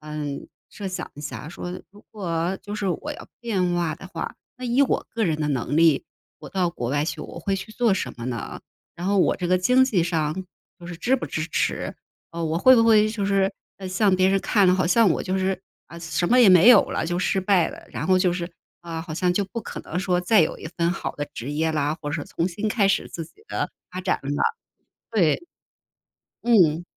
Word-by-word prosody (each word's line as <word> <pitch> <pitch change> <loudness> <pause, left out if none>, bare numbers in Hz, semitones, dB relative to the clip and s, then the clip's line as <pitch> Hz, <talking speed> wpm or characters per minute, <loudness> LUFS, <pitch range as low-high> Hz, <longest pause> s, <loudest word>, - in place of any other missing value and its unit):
嗯， 150 -2 -5 0.2
设 200 -2 -6
想 185 - -5
一 145 - -10
下 150 +1 -6
说 175 +1 -6 0.2
如 205 +1 -17
果 180 -3 -2
就 205 - -6
是 210 -2 -2
我 290 - -3
要 - - -11
变 190 -7 0
化 170 -3 0
的 185 +3 -11
话， - - -5 0.2
那 255 - -8
以 245 +2 +2
我 275 - 0
个 225 -1 -1
人 160 -4 0
的 150 -1 -1
能 140 +2 -1
力， 160 -4 +4 0.3
我 - - -10
到 180 -3 0
国 120 -8 -4
外 145 +1 +1
去 155 -1 -4
我 - - -8
会 195 +3 -1
去 220 +3 -8
做 230 -2 +2
什 190 - -2
么 115 - -7
呢？ 120 -2 -5 0.3
然 175 +2 -5
后 200 0 +2
我 - - +3
这 180 - -3
个 185 +1 +3
经 250 +8 +4
济 205 -9 +1
上 160 -3 0 0.5
就 175 - -10
是 175 -1 -7
支 250 +9 +1
不 - - -5
支 155 0 -3
持。 - - -1 0.4
啊， 170 0 -5
我 160 +1 0
会 255 +7 +7
不 230 - +5
会 215 -1 +5
就 215 -2 -3
是 195 -1 +2 0.4
向 190 +1 +2
别 185 0 +3
人 195 0 +3
看 200 -4 +3
了， 180 - +5
好 185 -1 +1
像 215 +5 +5
我 - - 0
就 190 +1 -1
是 190 0 0 0.3
啊， 170 - -11
什 170 +1 -1
么 250 - +5
也 245 - +8
没 185 +2 +7
有 235 -5 +9
了， - - -1
就 175 +1 -1
失 190 +1 +1
败 185 -3 +3
了， - - -11
然 - - -4
后 185 0 +4
就 180 -1 +2
是， 175 - -3 0.4
啊， 165 -1 -5
好 165 -1 -6
像 180 +2 +1
就 200 - +1
不 230 +3 -6
可 - - -7
能 175 - -5
说 180 -2 +1
再 190 +1 +4
有 155 - -2
一 - - -8
份 170 0 +1
好 195 - -4
的 145 - -2
职 125 +5 -6
业 160 +2 0
啦， 150 0 0
或 145 - -3
者 150 0 -2
重 170 - -2
新 205 +4 -3
开 210 -2 +2
始 195 0 +1
自 165 - -6
己 415 - -21
的 - - -2 0.2
发 180 - -6
展 - - +1
了， 135 - -6 0.8
对。 180 -9 +3 1.0
嗯， 175 -9 +4
180 Hz, 250 characters per minute, -24 LUFS, 160-200 Hz, 1.0 s, 有